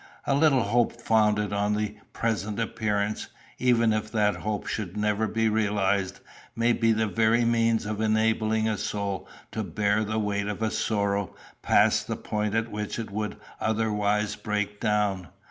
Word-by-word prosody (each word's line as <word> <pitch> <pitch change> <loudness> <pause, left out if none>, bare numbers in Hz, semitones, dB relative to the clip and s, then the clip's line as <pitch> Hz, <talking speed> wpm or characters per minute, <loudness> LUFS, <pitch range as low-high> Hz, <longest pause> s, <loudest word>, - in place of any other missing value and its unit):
A 140 - +1
little 140 -3 +4
hope 120 +3 +1
founded 105 -3 +2
on 105 +1 +1
a 105 0 -2 0.2
present 110 -2 -2
appearance, 105 -2 -1 0.3
even 115 -3 +3
if 110 0 -2
that 105 -2 +2
hope 105 -1 -3
should 100 -2 -4
never 105 +1 +1
be 115 +2 +1
realised, 100 -3 0 0.3
may 115 +1 +3
be 115 -1 +2
the 110 0 +2
very 115 +2 +2
means 115 -1 +2
of 105 0 -3
enabling 110 0 +2
a 110 -2 -1
soul 100 -2 -3 0.2
to 110 - -3
bear 105 +1 +1
the 110 +1 -2
weight 100 -1 -1
of 105 +2 -3
a 110 - +1
sorrow 100 -3 -1 0.3
past - - +3
the - - -3
point 105 0 -2
at 115 0 0
which 105 0 -4
it 115 -3 -5
would 105 +1 -3 0.2
otherwise 105 -1 0
break 105 -1 -3
down. 105 -4 0
105 Hz, 165 wpm, -27 LUFS, 105-110 Hz, 0.3 s, little